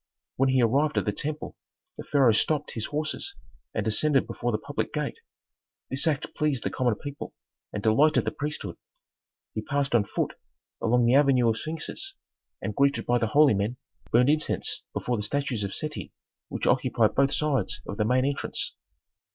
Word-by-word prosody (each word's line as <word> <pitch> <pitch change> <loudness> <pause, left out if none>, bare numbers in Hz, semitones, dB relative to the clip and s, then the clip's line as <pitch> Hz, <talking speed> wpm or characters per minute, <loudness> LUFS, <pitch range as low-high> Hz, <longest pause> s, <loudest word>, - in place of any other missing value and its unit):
When 135 +1 +3
he 130 -2 +4
arrived 140 +6 +2
at - - +2
the 105 - +1
temple 150 +8 -4 0.4
the - - -7
pharaoh 135 -5 +4
stopped 145 +7 +1
his 110 - -3
horses 155 - -3 0.4
and 105 - -2
descended 135 +6 +3
before 120 0 -2
the 110 - +1
public 140 +5 -3
gate. 150 -2 -3 0.7
This 135 +5 +1
act 145 -3 -1
pleased 145 -6 0
the - - -1
common 120 -4 +1
people 145 +6 -7 0.4
and 105 - -4
delighted 145 +8 +4
the - - 0
priesthood. 150 -1 -4 0.8
He 110 - -2
passed 140 +3 -1
on 115 -4 +4
foot - - -2 0.5
along 120 +1 +3
the 120 - +4
avenue 135 -4 +5
of 110 - 0
sphinxes 165 - -5 0.5
and, 105 - -3
greeted 140 0 +2
by 120 0 +2
the 115 - +1
holy 145 +3 +5
men, 105 +5 -1 0.3
burned 125 +3 +5
incense 155 0 0
before 120 -1 -1
the - - -2
statues 125 0 -1
of 100 - -3
Seti 150 -1 -4 0.4
which - - -3
occupied 120 -4 +3
both 140 0 +3
sides 130 -7 0
of 100 - -6
the 105 - +2
main 130 +3 +3
entrance. 140 0 -2
130 Hz, 175 wpm, -27 LUFS, 115-150 Hz, 0.8 s, avenue